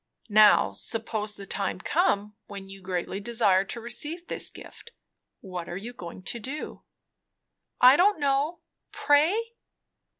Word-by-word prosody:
Now 210 0 +6
suppose 220 -2 -3
the 200 - -9
time - - -2
come 210 - 0
when 195 -1 -9
you 195 0 -11
greatly 185 +1 -3
desire 205 -4 +2
to 235 - -6
receive 295 +9 -4
this - - -2
gift, - - -13 0.5
what 180 -3 -7
are 175 - -5
you 230 +5 -7
going 175 -4 -10
to 235 - -5
do?" 270 +7 -6 1.0
"I 255 +2 +8
don't 390 0 +4
know. 285 +4 0 0.3
Pray?" 305 +8 +3
225 Hz, 135 wpm, -27 LUFS, 195-285 Hz, 1.0 s, I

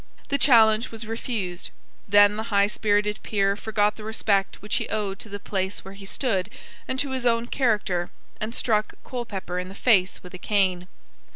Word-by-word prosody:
The 280 0 +1
challenge 225 -3 +5
was 225 0 -7
refused. 215 -5 -3 0.4
Then 205 +1 +6
the 220 +1 -4
high 200 -1 +4
spirited 210 0 0
peer 200 -2 +1
forgot 210 0 0
the 215 - -9
respect 205 -3 0
which 210 - -1
he - - -3
owed 205 -2 -2
to 220 - -10
the 205 0 -6
place 190 -1 -3
where 195 - -8
he 195 0 -11
stood 200 -5 -1 0.4
and 260 - -2
to 280 0 -1
his 260 -2 0
own 230 0 +2
character, 210 -9 0 0.3
and 220 +3 -4
struck 215 -2 0
Colepepper 200 -8 -4
in 180 - -4
the 190 - -10
face 195 -7 +2
with 180 - -11
a 185 - -8
cane. 185 -3 +1
210 Hz, 185 wpm, -25 LUFS, 195-225 Hz, 0.4 s, Then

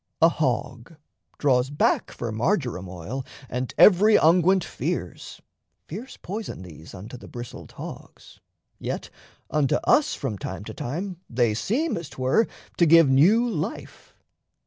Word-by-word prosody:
A 165 - +7
hog 130 -1 -2 0.4
draws 130 -2 +2
back 145 - +1
For 120 -2 -5
marjoram 120 - -1
oil, 95 +10 -6 0.2
and 125 +1 -3
every 210 +2 +7
unguent 180 +3 +4
fears 155 - -5 0.5
Fierce 225 - -8
poison 205 - -6
these 80 -1 -12
unto 105 +7 -9
the - - -12
bristled 120 -1 -9
hogs, - - -11 0.4
Yet - - -5 0.4
unto 145 -3 +2
us 295 - +3
from 110 -8 -4
time 95 +1 -6
to 110 - -8
time 175 - -4
they 120 -2 +2
seem, 255 - -1
As 170 -3 -6
'twere, 130 - +1 0.3
to 170 - +5
give 165 -2 +7
new 200 - +5
life. 235 - -5
140 Hz, 135 wpm, -25 LUFS, 120-180 Hz, 0.5 s, A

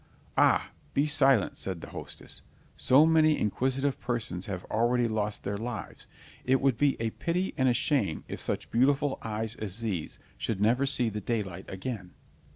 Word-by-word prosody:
"Ah, - - +4 0.2
be 140 - +3
silent," 135 -8 +4
said 95 -3 -4
the - - -10
hostess; - - -7 0.3
"so 140 +5 +5
many 155 -1 +4
inquisitive 130 +6 0
persons 115 -7 -3
have 95 -3 -4
already 120 +2 +1
lost 110 -1 -2
their 100 0 -2
lives, 115 -2 -6 0.4
it 130 +1 +3
would 135 -3 +2
be 140 +3 +2
a 115 -1 -1
pity 180 +8 -1
and 130 -1 +3
a - - +4
shame 120 - +1
if - - -6
such - - -3
beautiful 135 +3 +2
eyes 110 0 -3
as 105 0 -3
these 95 -9 -3 0.2
should 110 -4 -2
never 120 +6 +3
see 130 -4 +1
the 105 0 -4
daylight 95 -5 -3
again." 95 -2 -6
115 Hz, 165 wpm, -29 LUFS, 105-135 Hz, 0.4 s, so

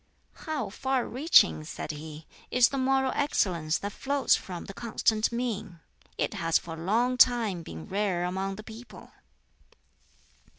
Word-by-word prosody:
"How 310 -7 -2
far 265 +3 -1
reaching," 240 - +4
said 115 - -5
he, 155 +1 -9 0.2
"is 250 -1 +5
the 275 - -3
moral 265 0 +2
excellence 170 - 0
that 205 - -5
flows 280 0 +2
from 180 -2 -7
the 195 - -8
Constant 220 0 0
Mean! 225 -7 -3 0.4
It - - -1
has 165 0 +2
for 165 - -7
a 165 0 -7
long 240 +7 +1
time 230 -8 +4
been 80 - -9
rare 195 -3 -1
among 190 +2 -2
the 215 - -9
people." 225 +3 -12
210 Hz, 145 wpm, -28 LUFS, 170-250 Hz, 0.4 s, is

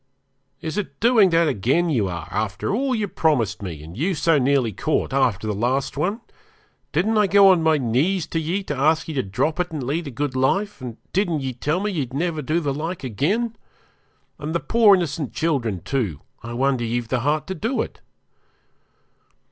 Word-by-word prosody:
'Is 160 +5 -3
it 205 - -6
doing 225 -4 +5
that 165 -1 +3
again 140 - +1
you 110 -9 +1
are, 85 -3 -5
after 105 - -2
all 260 +3 0
you 215 -2 -1
promised 125 - 0
me, 85 -7 -6
and 80 +3 -10
you 170 - 0
so 160 -1 +3
nearly 130 -3 +2
caught 155 - -1
after 125 -7 +1
the 105 - -1
last 125 +6 -1
one? 195 - -1 0.7
Didn't 215 +8 +2
I 210 - +4
go 200 0 +7
on 180 -3 +5
my 160 -1 +3
knees 145 +9 +1
to 165 - -1
ye 175 +5 -2
to 150 - -4
ask 155 +4 +2
ye 160 - -4
to 135 - +1
drop 140 - -1
it 180 0 0
and 150 -4 -4
lead 150 +5 -2
a - - -3
good 135 +1 -3
life, 195 +9 0
and 120 -3 -7 0.2
didn't 175 -6 +1
ye 130 -1 -3
tell 150 +8 -1
me 210 +1 -1
ye'd 135 -8 -3
never 160 0 -1
do 155 +4 0
the 145 -4 -1
like 160 +3 -4
again? 190 - -1 0.8
And 150 +3 -4
the - - +2
poor 220 -1 +5
innocent 155 -6 -3
children, 125 - -1
too, 105 - -2 0.2
I 115 0 -7
wonder 130 0 +1
ye've 120 0 -2
the 130 - +1
heart 150 +4 0
to 190 - -4
do 225 - -1
it.' - - -11
150 Hz, 200 wpm, -22 LUFS, 125-180 Hz, 0.8 s, go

